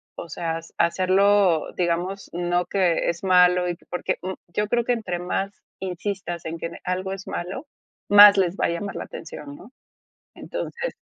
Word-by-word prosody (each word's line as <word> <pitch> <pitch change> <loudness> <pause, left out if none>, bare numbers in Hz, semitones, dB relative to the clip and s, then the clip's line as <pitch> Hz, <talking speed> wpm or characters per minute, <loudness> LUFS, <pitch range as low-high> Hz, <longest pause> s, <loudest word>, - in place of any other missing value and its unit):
o 170 - -8
sea, 165 +2 -3
hace 165 0 -12
hacerlo, 185 -1 +3
digamos, 180 +3 -2
no 175 +1 0
que 185 -4 +1
es 170 +2 -4
malo, 180 -1 +5
y 175 - -2
que - - -26
porque, 180 - -2
mm, 185 - -4 0.2
yo 210 +3 0
creo 240 0 +1
que 245 - +2
entre 215 -7 -3
más 195 +2 -2 0.3
insistas 185 -1 -4
en 160 +1 -4
que 165 - -4
en 170 - -10
algo 185 +1 -2
es 195 0 -7
malo, 190 - -5 0.4
más 205 0 +9
les 185 -2 +2
va - - 0
a - - -2
llamar 180 +4 -4
la - - -4
atención, 145 -3 -9
¿no? 240 - -14 0.6
Entonces - - -5
180 Hz, 185 wpm, -24 LUFS, 170-200 Hz, 0.6 s, más